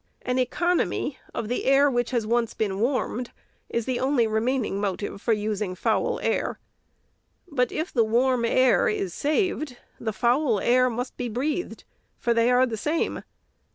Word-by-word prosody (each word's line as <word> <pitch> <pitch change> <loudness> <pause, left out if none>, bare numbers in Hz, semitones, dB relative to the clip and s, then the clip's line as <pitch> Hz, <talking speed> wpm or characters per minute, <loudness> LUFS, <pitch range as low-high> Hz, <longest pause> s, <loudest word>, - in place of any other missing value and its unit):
An 250 +1 0
economy 340 +1 0
of 220 - -4
the 245 - -2
air, 275 +2 +5
which 245 -3 0
has 235 -4 0
once 230 0 0
been 200 -3 -1
warmed, 245 0 -1 0.4
is 235 -1 -1
the 255 -2 -1
only 260 -3 +2
remaining 220 -1 0
motive 200 0 -3
for 235 - 0
using 210 -3 -1
foul - - 0
air. - - -1 0.9
But 250 -7 0
if 320 +3 -3
the 235 - +4
warm 240 +2 +2
air 255 +2 +4
is 195 -4 -2
saved, 305 - -1 0.2
the 225 - -2
foul 240 +1 +2
air 255 +3 +3
must 245 +2 -4
be 245 -1 -3
breathed; 290 +9 -3 0.3
for 235 - +1
they 230 +1 +3
are 250 +1 +5
the 230 -3 -4
same. 305 +9 -1
245 Hz, 160 wpm, -25 LUFS, 220-260 Hz, 0.9 s, air